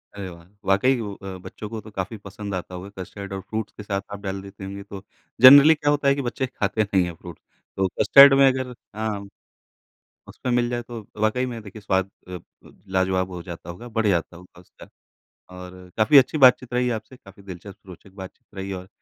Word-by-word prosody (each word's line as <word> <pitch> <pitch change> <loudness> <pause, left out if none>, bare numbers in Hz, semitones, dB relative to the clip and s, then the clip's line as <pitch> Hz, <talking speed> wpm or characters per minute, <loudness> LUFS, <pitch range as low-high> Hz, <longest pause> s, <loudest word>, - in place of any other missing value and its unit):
अरे 100 -2 -6
वाह! 85 -1 -13 0.2
वाक़ई 120 +7 +3
वो 105 -2 -5
अ, 95 -2 -8
बच्चों 105 - -8
को 115 0 -5
तो 110 - -13
काफ़ी 100 +2 -5
पसंद 100 0 -6
आता 90 0 -6
होगा 90 +2 -8
कस्टर्ड 100 +2 -8
और 95 - -4
फ्रूट्स 110 +2 -5
के 105 - -8
साथ 100 -1 -2
आप 100 - -6
डाल 95 -1 -4
देती 100 0 -12
होंगी 100 +1 -7
तो 100 -1 -10 0.4
जनरली 140 +5 +10
क्या 150 -1 -1
होता 145 -1 0
है 140 - +4
कि 140 - -2
बच्चे 130 +1 -3
खाते 110 -3 -1
नहीं 95 -4 0
फ्रूट। 85 -1 -12 0.4
तो 95 0 +2
कस्टर्ड 140 0 +9
में 135 - +7
अगर 130 -1 0 0.2
हाँ, 105 -2 -3 1.0
उसमें 125 - -4
मिल 120 0 +2
जाए 120 0 -2
तो 120 -1 -8 0.3
वाक़ई 125 +4 -1
में 120 -2 -6 0.2
स्वाद 95 -1 0 0.2
अ, - - -10 0.3
ब - - -19 0.2
लाजवाब 95 0 0
हो 90 -2 -7
जाता 85 -1 -9
होगा, 105 +8 -9
बढ़ 110 -1 -1
जाता 85 -2 -1
होगा 90 0 -16
उसका। 90 - -17 0.7
और 90 0 -9 0.3
काफ़ी 110 +6 +6
अच्छी 135 +3 +3
बातचीत 125 0 +5
रही 125 0 +1
आपसे, 120 +3 -6
काफ़ी 100 -4 -17
दिलचस्प 95 +1 -11
रोचक 95 +1 -13
बातचीत 95 - -14
रही 95 0 -5
और 95 0 -7
100 Hz, 205 wpm, -23 LUFS, 95-120 Hz, 1.0 s, जनरली